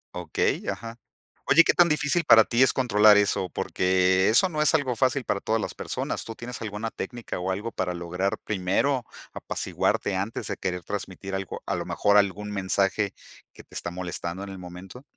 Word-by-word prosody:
Okey, 90 -3 -1
ajá. 115 0 -6 0.5
Oye, 170 - +7
¿qué - - +3
tan 175 -2 +5
difícil 150 +3 +1
para 110 -6 +7
ti 120 +2 +1
es 130 - +6
controlar 105 -5 +5
eso? 100 -3 +1
Porque, 95 +2 +2
eso 120 - +5
no 155 -4 -2
es 155 - +4
algo 130 -6 0
fácil 130 0 +1
para 100 - -1
todas 110 +1 0
las - - -4
personas, - - -4
¿tú 115 - -8
tienes 120 +1 -8
alguna 110 +1 -4
técnica, 120 -6 -6
o 90 +1 -3
algo 105 +5 -4
para 90 -2 -2
lograr 90 +5 -2
primero 105 +7 0 0.3
apaciguarte 95 - -1
antes 100 +4 -3
de - - -4
querer 90 -2 -3
transmitir 95 0 -6
algo, 95 -1 -5
a - - -2
lo - - -4
mejor 105 0 +3
algún 105 +1 +1
mensaje 100 +1 0 0.4
que - - -14
te - - -23
está - - -4
molestando 90 +1 -5
en 100 - -7
el 95 -1 -8
momento? 90 +7 -10
105 Hz, 190 wpm, -26 LUFS, 95-120 Hz, 0.5 s, Oye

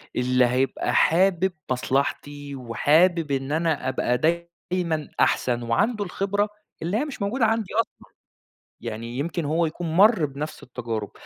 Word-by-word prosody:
اللي 125 0 +3
هيبقى 130 +2 0
حابِب 185 +1 +3 0.2
مصلحتي 140 +2 -1
وحابِب 150 +7 +2
إن 135 +1 -1
أنا 160 -4 0
أبقى 125 -1 0
دايمًا 170 0 -2
أحسن، 120 -1 +2
وعنده 205 - +1
الخبرة 200 +3 -1 0.3
اللي 175 +6 -1
هي 290 - 0
مش 275 -7 -8
موجودة 225 +4 +1
عندي 220 -2 0
أصلًا. 230 - -2 0.8
يعني 115 +3 -5
يمكن 170 +2 -2
هو 160 +3 +1
يكون 160 0 -4
مَر 205 -4 +6
بنفس 150 +2 -6
التجارب. 115 -4 -5
155 Hz, 135 wpm, -24 LUFS, 130-185 Hz, 0.8 s, مَر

